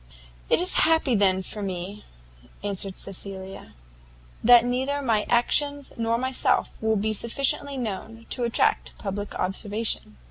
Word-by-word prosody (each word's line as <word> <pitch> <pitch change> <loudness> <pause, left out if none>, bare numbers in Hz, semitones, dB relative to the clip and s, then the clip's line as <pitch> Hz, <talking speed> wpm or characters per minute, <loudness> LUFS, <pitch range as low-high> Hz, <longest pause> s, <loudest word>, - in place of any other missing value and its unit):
"It - - +4
is 360 +2 +3 0.2
happy 320 -5 +3
then, 190 -3 +3
for 210 - -6
me," 195 +1 -5 0.6
answered 195 -1 -3
Cecilia, 195 0 -6 0.7
"that 240 0 +7
neither 260 +4 -1
my 225 -6 0
actions 285 +4 +2
nor 230 0 0
myself 260 +1 +1
will 220 0 +2
be 215 +1 0
sufficiently 275 +5 +1
known 225 0 -5
to 250 - 0
attract 235 -1 +1
public 205 0 -5
observation." 205 - -3
220 Hz, 130 wpm, -25 LUFS, 195-250 Hz, 0.7 s, that